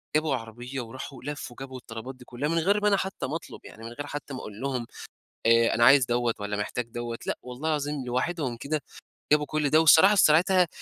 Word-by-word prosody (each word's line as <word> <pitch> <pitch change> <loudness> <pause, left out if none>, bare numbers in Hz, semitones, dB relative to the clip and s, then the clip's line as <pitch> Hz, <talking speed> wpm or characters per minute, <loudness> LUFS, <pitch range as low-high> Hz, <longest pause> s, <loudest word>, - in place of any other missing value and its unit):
جابوا 155 -3 +2
عربية 120 +3 -6
وراحوا 130 +2 -9
لفّوا 145 -4 -6
وجابوا 130 -1 -7
الطلبات 125 +2 -8
دي 125 - -15
كلّها 135 +6 -3
من 165 0 +1
غير 200 +5 +2
ما 210 - +2
أنا 200 - +4
حتى 190 -6 -3
ما 150 - -4
أطلب، - - -7
يعني 110 - -12
من 115 - -6
غير 145 +4 -7
حتى 145 -1 -6
ما 130 - -5
أقول 105 +3 -9
لهم 130 -4 -2 0.6
آآ، 115 0 +5
أنا 120 - +3
عايز 135 0 +7
دوَّة 120 -1 0
والَّا 105 0 -3
محتاج 110 +3 -2
دوَّة، 120 0 -5
لأ - - -2
والله 125 +5 -5
العظيم 145 -3 -1
لوحدهم 130 0 -2
كده، 150 +5 -2 0.5
جابوا 150 -1 +4
كُلّ 150 -2 -1
ده، 155 - +5
والصراحة 160 +6 +7
في 195 - +5
ساعتها 175 +3 +4
135 Hz, 220 wpm, -27 LUFS, 120-155 Hz, 0.6 s, عايز